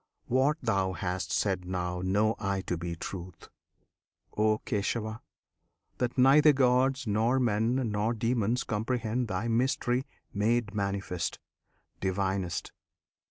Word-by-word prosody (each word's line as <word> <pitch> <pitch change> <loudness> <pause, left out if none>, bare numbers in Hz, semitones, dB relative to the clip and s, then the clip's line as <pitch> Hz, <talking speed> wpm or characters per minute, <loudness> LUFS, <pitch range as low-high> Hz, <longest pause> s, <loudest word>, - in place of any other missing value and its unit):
What 135 +5 +2
Thou 95 -5 +1
hast 90 -1 -3
said 95 -3 0
now 90 -1 -3
know 105 +4 +2
I 100 -1 -1
to 90 - -3
be 85 0 -4
truth, 90 0 -8 0.9
O 110 0 +3
Kesava! 110 +2 -2 0.8
that 125 +1 -1
neither 145 +4 +7
gods 130 0 +2
nor 110 +5 +2
men 115 0 +1 0.2
Nor 105 +3 0
demons 115 +1 0
comprehend 115 +2 -1
Thy 100 +3 -2
mystery 125 +2 +1 0.3
Made 110 +1 +1
manifest, 100 -4 -2 0.6
Divinest! 95 -1 -1
110 Hz, 115 wpm, -29 LUFS, 95-120 Hz, 0.9 s, neither